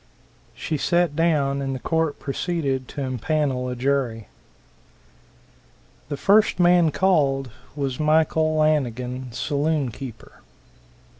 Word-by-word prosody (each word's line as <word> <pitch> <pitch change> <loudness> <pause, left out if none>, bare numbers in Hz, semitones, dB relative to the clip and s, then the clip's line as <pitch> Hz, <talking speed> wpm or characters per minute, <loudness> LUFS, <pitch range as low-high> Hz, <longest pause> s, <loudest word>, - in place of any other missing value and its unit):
She 155 - -3
sat 170 +1 +1
down 145 -4 +1
and 135 -1 -2
the - - -5
court 160 +1 -1
proceeded 140 -3 -2
to 145 - -6
impanel 130 0 -1
a - - -4
jury. 125 -4 -1 1.8
The 145 - -3
first 205 +4 +3
man 175 -2 +5
called 140 -8 +1 0.2
was 135 -3 -3
Michael 155 0 +2
Lanigan, 130 -4 0
saloon 145 +2 -1
keeper. 125 0 -10
140 Hz, 105 wpm, -23 LUFS, 130-160 Hz, 1.8 s, man